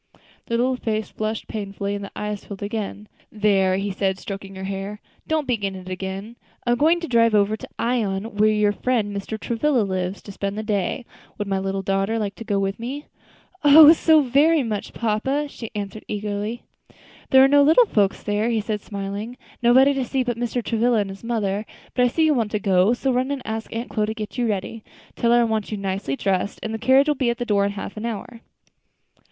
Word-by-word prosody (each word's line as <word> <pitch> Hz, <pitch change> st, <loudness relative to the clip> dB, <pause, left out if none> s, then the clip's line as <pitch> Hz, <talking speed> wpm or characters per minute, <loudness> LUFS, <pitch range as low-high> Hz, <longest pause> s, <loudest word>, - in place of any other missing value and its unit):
The 230 Hz, -, 0 dB
little 255 Hz, +2 st, +1 dB
face 215 Hz, -3 st, -2 dB
flushed 215 Hz, 0 st, -3 dB
painfully, 200 Hz, -2 st, -4 dB
and 200 Hz, 0 st, -4 dB
the 200 Hz, -, -8 dB
eyes 210 Hz, -1 st, -4 dB
filled 200 Hz, -1 st, -8 dB
again. 210 Hz, 0 st, -4 dB, 0.2 s
"There," 195 Hz, -3 st, +2 dB
he 200 Hz, +1 st, -2 dB
said, 190 Hz, 0 st, -1 dB
stroking 195 Hz, 0 st, -7 dB
her 190 Hz, -, -7 dB
hair, 195 Hz, +2 st, -5 dB, 0.3 s
"don't 315 Hz, -2 st, 0 dB
begin 205 Hz, -6 st, -1 dB
it 185 Hz, 0 st, -9 dB
again. 190 Hz, +5 st, -5 dB, 0.3 s
I 240 Hz, -, +2 dB
am 240 Hz, -, +2 dB
going 325 Hz, +5 st, +4 dB
to 335 Hz, -, -4 dB
drive 230 Hz, -3 st, +3 dB
over 205 Hz, +1 st, +3 dB
to -, -, -10 dB
Ion, 215 Hz, -5 st, 0 dB
where 215 Hz, +1 st, +5 dB
your 210 Hz, -1 st, +3 dB
friend 210 Hz, -2 st, -1 dB
Mr. 210 Hz, +2 st, -4 dB
Travilla 240 Hz, +2 st, +1 dB
lives, 185 Hz, -1 st, -3 dB
to 205 Hz, -, -9 dB
spend 200 Hz, +1 st, -4 dB
the 215 Hz, -, -3 dB
day; 210 Hz, +3 st, -1 dB, 0.3 s
would 205 Hz, -, -3 dB
my 195 Hz, -1 st, 0 dB
little 195 Hz, 0 st, -2 dB
daughter 195 Hz, +3 st, 0 dB
like 205 Hz, -2 st, -2 dB
to -, -, -7 dB
go 210 Hz, -3 st, -1 dB
with 195 Hz, +1 st, -1 dB
me?" 270 Hz, +6 st, -5 dB, 0.6 s
"Oh! 300 Hz, +2 st, +10 dB
so 315 Hz, -1 st, +4 dB
very 285 Hz, +4 st, +3 dB
much, 215 Hz, -3 st, -4 dB
papa!" 250 Hz, +7 st, 0 dB
she 230 Hz, -5 st, -8 dB
answered 205 Hz, +1 st, -5 dB
eagerly. 210 Hz, +2 st, -3 dB, 0.7 s
"There 265 Hz, 0 st, +7 dB
are -, -, +7 dB
no 285 Hz, +1 st, +5 dB
little 320 Hz, +12 st, +6 dB
folks 205 Hz, -, +1 dB
there," 210 Hz, +2 st, 0 dB
he 230 Hz, -2 st, +1 dB
said 210 Hz, -1 st, -3 dB
smiling, 200 Hz, +4 st, -5 dB, 0.2 s
"nobody 260 Hz, +4 st, +5 dB
to 270 Hz, -1 st, -1 dB
see 260 Hz, +1 st, -1 dB
but 245 Hz, -1 st, -2 dB
Mr. 240 Hz, +1 st, -2 dB
Travilla 235 Hz, +1 st, +1 dB
and 200 Hz, -2 st, -1 dB
his 195 Hz, +2 st, -11 dB
mother. 210 Hz, -3 st, -1 dB, 0.3 s
But 250 Hz, -, +3 dB
I -, -, +4 dB
see 320 Hz, +6 st, +2 dB
you 310 Hz, -, +4 dB
want 230 Hz, -6 st, 0 dB
to 210 Hz, -, +1 dB
go; 195 Hz, +1 st, +3 dB
so 265 Hz, +2 st, 0 dB
run 255 Hz, +2 st, 0 dB
and 280 Hz, -3 st, -3 dB
ask 220 Hz, 0 st, -4 dB
Aunt 230 Hz, +2 st, -5 dB
Chloe 210 Hz, -2 st, 0 dB
to 220 Hz, -, -3 dB
get 215 Hz, -2 st, -6 dB
you 245 Hz, -2 st, 0 dB
ready. 215 Hz, +2 st, -3 dB, 0.3 s
Tell 235 Hz, -, +1 dB
her 240 Hz, 0 st, +5 dB
I -, -, +4 dB
want 220 Hz, -2 st, -1 dB
you 210 Hz, -, -2 dB
nicely 195 Hz, -7 st, -2 dB
dressed, 195 Hz, +4 st, -1 dB
and 220 Hz, -, -3 dB
the 225 Hz, -, -3 dB
carriage 265 Hz, +5 st, +4 dB
will 300 Hz, -, +3 dB
be 260 Hz, -4 st, 0 dB
at 235 Hz, -, -1 dB
the 245 Hz, -, -3 dB
door 200 Hz, -3 st, +2 dB
in 200 Hz, -, -2 dB
half 200 Hz, 0 st, -6 dB
an 220 Hz, +2 st, -3 dB
hour." 230 Hz, +1 st, -6 dB
215 Hz, 225 wpm, -23 LUFS, 200-245 Hz, 0.7 s, Oh